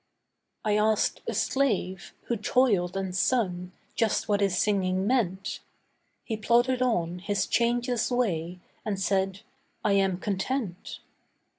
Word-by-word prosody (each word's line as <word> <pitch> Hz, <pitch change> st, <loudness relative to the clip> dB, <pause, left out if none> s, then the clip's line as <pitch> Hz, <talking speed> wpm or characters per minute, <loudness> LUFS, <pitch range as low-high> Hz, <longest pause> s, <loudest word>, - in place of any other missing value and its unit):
I 210 Hz, -1 st, +3 dB
asked 215 Hz, 0 st, +2 dB
a -, -, -1 dB
slave, 205 Hz, -9 st, 0 dB
who 235 Hz, -, -1 dB
toiled 210 Hz, -5 st, +2 dB
and 190 Hz, -2 st, -3 dB
sung, 185 Hz, -4 st, 0 dB, 0.2 s
just 225 Hz, -2 st, 0 dB
what 205 Hz, -1 st, +1 dB
his 195 Hz, -3 st, +2 dB
singing 190 Hz, -2 st, +1 dB
meant. 195 Hz, -6 st, 0 dB, 0.6 s
He 225 Hz, -, -3 dB
plodded 240 Hz, +3 st, +2 dB
on 180 Hz, -8 st, 0 dB
his 200 Hz, +2 st, -1 dB
changeless 240 Hz, 0 st, +1 dB
way, 180 Hz, -9 st, -1 dB, 0.3 s
and 205 Hz, -3 st, -2 dB
said, 195 Hz, +1 st, 0 dB, 0.4 s
'I 210 Hz, -, +3 dB
am 195 Hz, -2 st, +2 dB
content. 195 Hz, +1 st, -3 dB
200 Hz, 125 wpm, -27 LUFS, 185-235 Hz, 0.6 s, I